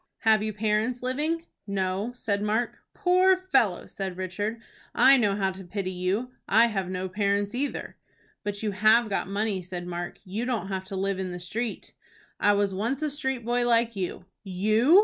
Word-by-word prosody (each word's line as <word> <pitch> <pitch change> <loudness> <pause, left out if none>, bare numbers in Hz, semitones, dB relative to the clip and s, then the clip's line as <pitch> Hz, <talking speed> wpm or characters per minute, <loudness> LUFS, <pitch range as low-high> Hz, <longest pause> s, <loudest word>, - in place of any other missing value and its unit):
"Have 220 -1 +4
you 215 0 -1
parents 215 +4 0
living?" 305 +6 -1 0.2
"No," 195 +3 -1
said 205 -4 -1
Mark. 220 +3 0 0.2
"Poor 370 -1 +4
fellow!" 265 - +1
said 190 -2 -5
Richard. 205 +5 -3 0.4
"I 270 +1 +7
know 210 -6 +2
how 195 -2 +1
to 190 +1 -9
pity 185 +1 -3
you. 190 +7 -1 0.2
I 225 +3 +6
have 195 -5 -2
no 185 0 -2
parents 200 +2 0
either." 275 +3 -3 0.5
"But 205 0 -3
you 210 - 0
have 215 +3 +4
got 195 - -1
money," 200 0 -1
said 180 0 -6
Mark. 175 0 -5
"You 205 +5 -3
don't 235 -6 -2
have 190 -1 -3
to 195 - -6
live 195 0 -1
in 190 -1 -2
the 180 0 -5
street." 220 +6 -4 0.5
"I 205 - +4
was 200 -1 +1
once 235 +9 -1
a 305 - 0
street 265 -4 -2
boy 240 0 +1
like 230 -1 +3
you." 180 -1 -4 0.2
"You!" 215 - +4
210 Hz, 185 wpm, -27 LUFS, 190-240 Hz, 0.5 s, I